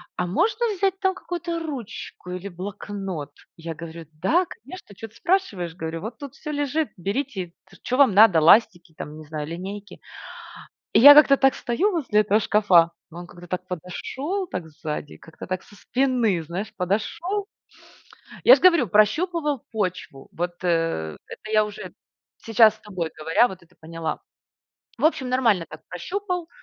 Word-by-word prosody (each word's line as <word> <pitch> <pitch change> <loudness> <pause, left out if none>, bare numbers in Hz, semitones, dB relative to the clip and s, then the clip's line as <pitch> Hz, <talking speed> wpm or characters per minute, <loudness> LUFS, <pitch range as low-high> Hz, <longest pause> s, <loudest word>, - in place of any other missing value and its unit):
"А 180 - -2
можно 450 - +1
взять 385 0 0
там 380 -1 +1
какую-то 345 -2 -4
ручку 255 - -7
или 180 +2 -5
блокнот?" 190 -4 -6 0.3
Я 165 0 -6
говорю: 165 0 -9 0.2
"Да 345 - +3
конечно, 365 - -12
чё 225 - -8
ты 225 - -24
спрашиваешь"- 200 - -1
говорю,- 165 -1 -5
"вот 225 +2 -7
тут 280 -3 -9
всё 300 - -7
лежит, 290 +1 -1
берите, 195 -2 -3 0.2
ш - - -16
чё 255 - -1
вам 270 -8 +5
надо, 200 -5 +7
ластики 175 -1 +4
там, 150 +1 -7
не 155 - -11
знаю, 150 -1 -5
линейки". 195 +5 -7 0.9
И - - +6
я 285 +4 +11
как-то 285 -2 +7
так 270 -1 +4
стою 340 - 0
возле 255 - +1
этого 210 +1 +2
шкафа, 190 -6 +4 0.2
но 170 - -9
он 175 - -9
как-то 175 0 -13
так 180 +1 -4
подошел 265 - -4
так 180 - -5
сзади, 150 -1 -6
как-то 160 - -12
так 185 0 -3
со 205 - -18
спины, 245 -6 0
знаешь, 185 +7 -6
подошел. 335 - -2 1.0
Я - - +9
ж - - -5
говорю, 340 - +5
прощупывал 295 - +1
почву. 185 -10 -4
Вот, 175 +1 -2
э, 165 - 0
это 215 - -10
я 215 -1 +4
уже 210 -1 -9 0.4
сейчас, 220 -1 +4
с - - -24
тобой 180 -6 -4
говоря, 165 +10 +3
вот 185 -4 -11
это 180 +2 -26
поняла. 160 -1 -5 0.8
В 275 - -2
общем, 305 -5 +2
нормально 230 -9 +2
так 155 - -11
прощупал. 360 - -4
205 Hz, 165 wpm, -23 LUFS, 175-285 Hz, 1.0 s, я